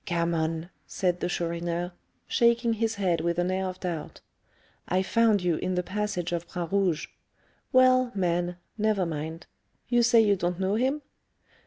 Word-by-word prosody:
"Gammon!" 170 -1 -1 0.2
said 180 -2 0
the 175 - -1
Chourineur, 170 +1 -2 0.4
shaking 235 -1 +3
his 225 0 -1
head 180 -5 +1
with 170 0 -1
an 175 +1 +1
air 190 0 -1
of 185 0 -6
doubt. 170 -5 -5 0.7
"I 185 +1 +1
found 220 -2 +3
you 175 -3 +1
in 185 - -2
the 180 - 0
passage 190 -3 -2
of 170 0 -3
Bras 175 -2 -5
Rouge. 190 -5 +1 0.7
Well, 255 -1 +5
man, 175 -1 0 0.2
never 210 -3 +2
mind. 160 +1 -5 0.4
You 240 -1 +4
say 235 0 +5
you 210 -2 +4
don't 180 -1 -2
know 190 +1 +1
him?" 265 +6 0
180 Hz, 160 wpm, -27 LUFS, 170-215 Hz, 0.7 s, Well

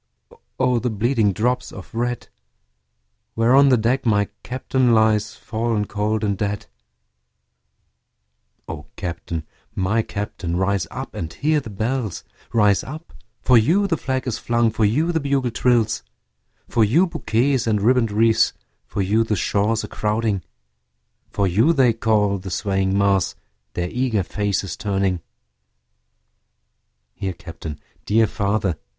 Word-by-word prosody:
O 125 -2 +3
the 125 - -1
bleeding 110 0 +1
drops 125 +6 -1
of 95 - -11
red, 120 +1 -2 1.1
Where 115 +2 +3
on 140 0 +7
the 130 - +5
deck 120 +5 +1
my 105 -3 +2
Captain 130 -1 +1
lies, 110 -1 +2
Fallen 110 -2 -2
cold 105 +1 -1
and 100 -1 +1
dead. 100 0 -3 2.0
O 75 -2 -7
Captain! 85 -2 -4 0.3
my 105 +5 +1
Captain! 100 -5 -4
rise 95 +1 0
up - - -7
and 80 -1 -5
hear 150 - +1
the 130 - -8
bells; 110 0 -2 0.3
Rise 105 -4 +3
up 155 +4 -9 0.3
for 125 -2 +6
you 175 - +3
the 185 -4 +1
flag 130 -3 -2
is 125 -4 -2
flung 120 -1 +1
for 110 0 +1
you 150 +11 +2
the 165 - +1
bugle 140 -4 0
trills, 120 -2 +2 0.7
For 115 - +2
you 140 - +4
bouquets 130 -6 0
and 105 -2 +2
ribbon'd 115 +1 +3
wreaths 115 +1 +3 0.3
for 100 - -2
you 105 +4 +2
the 110 -1 -1
shores 105 +3 0
a - - -5
crowding, 105 -2 -1 0.9
For 100 - 0
you 110 - +3
they 130 -6 +4
call, 105 -3 +1
the 95 - -7
swaying 95 +1 0
mass, 100 -3 +2 0.4
their 90 0 -2
eager 120 -5 0
faces 100 +1 -2
turning; 95 -3 -1 1.9
Here 95 +6 -4
Captain! 80 -3 -8 0.2
dear 110 +2 +3
father! 100 -5 -1
110 Hz, 140 wpm, -22 LUFS, 100-125 Hz, 2.0 s, on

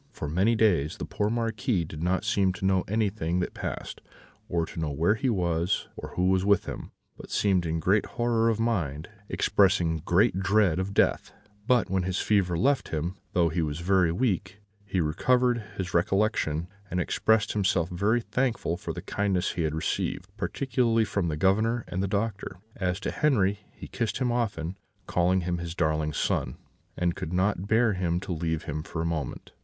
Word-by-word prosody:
"For 120 - -6
many 95 +10 +2
days 90 -10 +2
the - - -4
poor 105 - -1
Marquis 115 - 0
did 75 0 -8
not 90 +4 0
seem 100 -4 +2
to 95 - -5
know 95 -1 +3
anything 100 -5 0
that 90 - -2
passed, - - -5 0.5
or 85 -1 0
to 85 - -8
know 80 -2 -1
where 80 +8 +2
he 115 +4 -1
was, 85 -3 0
or - - -8
who 90 +1 +2
was 95 0 +2
with 100 0 +3
him, - - -7 0.3
but - - -11
seemed 95 -4 +1
in 80 +1 -1
great 95 +6 +2
horror 120 -1 +1
of 110 -1 0
mind, 85 -10 -1 0.2
expressing 90 -5 +2
great 95 - +3
dread 100 -3 +3
of 100 +1 -3
death; - - +2 0.4
but 125 -6 +3
when 95 -1 0
his 90 +1 -2
fever 95 -5 +2
left 135 +6 +1
him, 80 +4 -2 0.2
though 85 -2 +3
he 85 +2 -1
was 75 0 -2
very 90 -2 +3
weak, 95 -1 -1 0.3
he 95 - -1
recovered 120 +9 +2
his 90 -2 -4
recollection, 85 -3 +1 0.2
and 90 - -1
expressed 110 +4 +2
himself 95 -4 +1
very 100 +7 +1
thankful 115 -9 -1
for - - -5
the - - -7
kindness 100 -3 0
he 85 - -3
had 80 -1 0
received, 85 +3 -2
particularly 115 +1 +1
from 100 -4 -1
the 75 -2 -2
Governor 110 +7 +2
and 95 - -3
the 100 - 0
doctor. 100 -2 -2 0.2
As 90 -1 -1
to - - -2
Henri, 105 -9 +2
he - - -10
kissed 115 -2 -2
him 125 -2 0
often, 100 -8 -2 0.3
called 90 +1 +2
him 85 0 -1
his 85 0 -5
darling 80 -2 0
son, 65 -2 -1 0.4
and 90 -1 0
could 80 - -5
not 95 +1 0
bear 110 +1 +3
him 90 -2 0
to 100 -2 -4
leave 80 -1 -2
him 75 +1 -4
for 80 - -6
a 80 - -1
moment. 80 -3 -4
95 Hz, 190 wpm, -27 LUFS, 85-110 Hz, 0.5 s, know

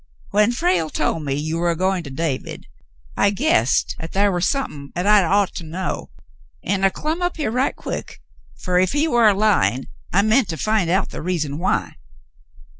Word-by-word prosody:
"^ - - -37 0.3
"When 210 +3 +3
Frale 265 - +1
told 160 - -1
me 140 -2 -1
you 155 +3 -2
war 175 0 +1
a 170 - +1
goin' 185 +1 0
to - - -7
David, 135 -1 -4 0.5
I - - +3
guessed 140 - +1
'at 160 - -7
thar 200 +1 +3
war 175 -1 -1
somethin' 150 - -2
'at 180 - -2
I'd 205 -2 +5
ought 200 +2 +2
to - - -6
know, 175 +4 -4 0.5
an' 195 +1 -1
I 195 - +6
clum 310 - -3
up 355 0 -1
here 290 -9 -1
right 255 +3 0
quick, - - -6 0.4
fer 180 - 0
if 185 +5 +1
he 295 +2 +2
war 240 -6 +4
a 200 - +2
lyin', 195 - +2 0.3
I 200 +3 +3
meant 220 +2 +3
to 160 - -3
find 215 -4 +1
out 190 +3 +1
the - - -6
reason 155 -4 -2
why." 180 - -1
190 Hz, 200 wpm, -21 LUFS, 165-215 Hz, 0.5 s, I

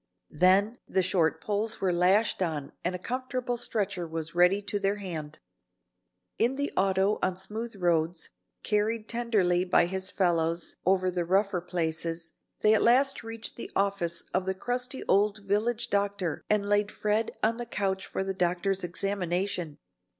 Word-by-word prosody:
Then 195 +8 +3
the 190 - +1
short 175 -3 +1
poles 215 +2 -2
were 185 -2 +1
lashed 190 +5 +3
on 155 -6 -2
and 180 +1 -1
a - - -2
comfortable 255 +4 -3
stretcher 200 -7 -2
was 160 0 -5
ready 180 +3 +4
to 205 0 -2
their 200 +1 +1
hand. 160 -7 -6 1.0
In 245 +3 +2
the 285 +1 -2
auto 195 +2 +2
on 185 -1 0
smooth 220 +4 -5
roads, 170 -2 0 0.3
carried 215 +1 0
tenderly 210 -7 +1
by 180 -1 +4
his 190 +2 -2
fellows 170 -2 0
over 185 -1 +3
the 175 -1 -1
rougher 190 +1 +1
places, 165 -1 -3 0.3
they 215 - +5
at 220 - +4
last 265 +4 +4
reached 225 -1 -4
the - - -6
office 195 -4 +1
of 185 0 0
the 190 - 0
crusty 250 +5 -3
old 210 +2 +2
village 220 +4 0
doctor 200 -4 0
and 210 -1 +2
laid 205 0 +2
Fred 215 +1 -1
on 225 +1 +2
the 240 -1 -5
couch 190 -3 -2
for - - -2
the 195 0 -2
doctor's 185 +1 0
examination. 180 -3 -2
195 Hz, 155 wpm, -28 LUFS, 175-215 Hz, 1.0 s, they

